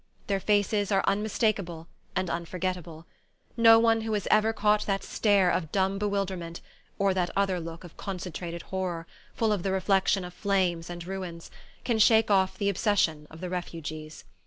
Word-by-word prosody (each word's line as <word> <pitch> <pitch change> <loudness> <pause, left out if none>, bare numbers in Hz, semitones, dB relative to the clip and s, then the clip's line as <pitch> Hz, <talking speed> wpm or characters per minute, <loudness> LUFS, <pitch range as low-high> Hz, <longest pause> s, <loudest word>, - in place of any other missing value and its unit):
Their 195 -1 0
faces 205 0 +1
are 195 -1 +3
unmistakable 200 -5 0 0.3
and 185 - 0
unforgettable. 170 -1 -4 0.5
No 230 -1 +7
one 225 0 +3
who 220 0 -3
has 205 -2 -1
ever 215 +1 +4
caught 210 -1 +1
that 195 -1 0
stare 200 -4 +3
of 160 -4 -2
dumb 195 0 +1
bewilderment 195 -5 -2 0.4
or 195 -1 +2
that 180 -2 0
other 195 -2 +1
look 165 0 -8
of 175 - -13
concentrated 175 -2 -5
horror, 180 -3 -3 0.3
full 220 -2 +2
of 200 - -1
the 195 - -1
reflection 190 0 +2
of 180 - -9
flames 180 -4 0
and 175 -1 -7
ruins 180 -3 -6 0.3
can 235 -3 0
shake 220 0 +5
off 190 -1 +3
the 200 - -1
obsession 180 -7 +1
of 160 +1 -12
the 180 - -4
Refugees. 155 -3 -6
190 Hz, 165 wpm, -28 LUFS, 175-205 Hz, 0.5 s, No